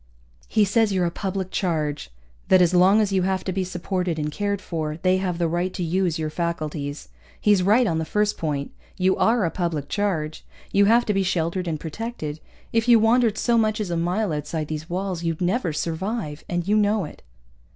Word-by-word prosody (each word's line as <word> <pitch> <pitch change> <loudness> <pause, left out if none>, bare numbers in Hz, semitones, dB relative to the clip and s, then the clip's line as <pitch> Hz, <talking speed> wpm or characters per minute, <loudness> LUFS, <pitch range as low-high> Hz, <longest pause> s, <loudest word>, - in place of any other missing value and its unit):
"He 215 -2 +3
says 215 +2 +2
you're 185 -2 +1
a 170 - -1
public 190 0 -3
charge, 155 - -1 0.4
that 185 - +6
as 180 0 +4
long 190 +4 +5
as 205 -2 0
you 190 -1 +2
have 190 0 0
to 190 - -2
be 190 +1 -1
supported 180 -1 -2
and 150 -1 -2
cared 200 +3 -1
for, 155 -5 -4
they 185 0 +4
have 185 -2 -2
the 170 -1 +1
right 175 +3 -1
to 180 - -2
use 175 0 0
your 155 -1 -3
faculties. 155 -4 -3 0.3
He's 205 -3 +4
right 215 +7 +4
on 165 -6 0
the - - -1
first 210 +4 +1
point. 145 -3 -3 0.3
You 185 0 +3
are 225 -3 +3
a 165 - -1
public 170 -6 -2
charge. 170 -7 -2 0.3
You 200 0 +4
have 235 +3 +4
to 210 - +1
be 195 - +1
sheltered 180 0 -1
and 155 -2 -2
protected. 160 -3 -5 0.3
If 225 +1 +1
you 240 -1 +8
wandered 225 -1 +3
so 235 -1 +2
much 215 0 +1
as 200 -5 -3
a - - 0
mile 175 +3 0
outside 150 +1 -3
these 155 +1 -5
walls 185 -1 -2
you'd 165 -2 -2
never 180 +1 0
survive, 160 +1 -3
and 175 0 -2
you 210 +1 +3
know 210 -2 +2
it." - - -11
180 Hz, 210 wpm, -24 LUFS, 160-205 Hz, 0.4 s, you